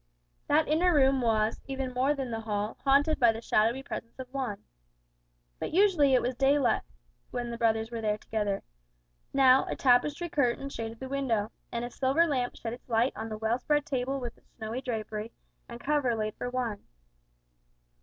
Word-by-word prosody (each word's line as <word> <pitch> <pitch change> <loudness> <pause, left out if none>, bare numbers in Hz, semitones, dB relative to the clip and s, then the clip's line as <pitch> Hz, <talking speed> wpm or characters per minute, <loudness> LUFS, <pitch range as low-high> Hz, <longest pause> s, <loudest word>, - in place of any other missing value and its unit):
That 305 +2 +3
inner 335 +4 +3
room 270 -2 +4
was, 220 -2 +1
even 265 -1 -3
more 265 +4 +2
than 265 -3 -4
the 225 - -2
hall, 210 -1 -3
haunted 285 +3 +3
by 235 -2 +6
the 225 - -6
shadowy 230 +3 +1
presence 230 -3 -7
of 260 -1 -7
Juan. 255 -7 -3 1.0
But - - -2
it - - -8
was - - +1
usually 300 -10 +5 0.2
daylight 275 -1 +3 0.5
when 240 -1 -4
the 235 - -5
brothers 225 0 +1
were 230 -1 -4
there 210 -1 0
together. 210 -2 -2 0.7
Now, 265 -1 +5
a - - -2
tapestry 285 +6 +2
curtain 275 -4 0
shaded 225 -3 -6
the 265 - -6
window, 245 -6 -1 0.2
and 235 0 -2
a 240 - -7
silver 275 +7 +2
lamp 255 -6 -1
shed 225 0 -5
its 245 - -12
light 230 +3 +2
on 225 - -5
the 215 - -5
well 220 +3 0
spread 295 +2 +1
table 270 +1 -1
with 240 -2 -6
its - - -35
snowy 225 +2 -4
drapery, 220 -2 -4 0.4
and 235 0 -8
cover 275 -3 +1
laid 215 -1 -2
for 245 - -4
one. 245 -5 -3
245 Hz, 185 wpm, -29 LUFS, 225-275 Hz, 1.0 s, by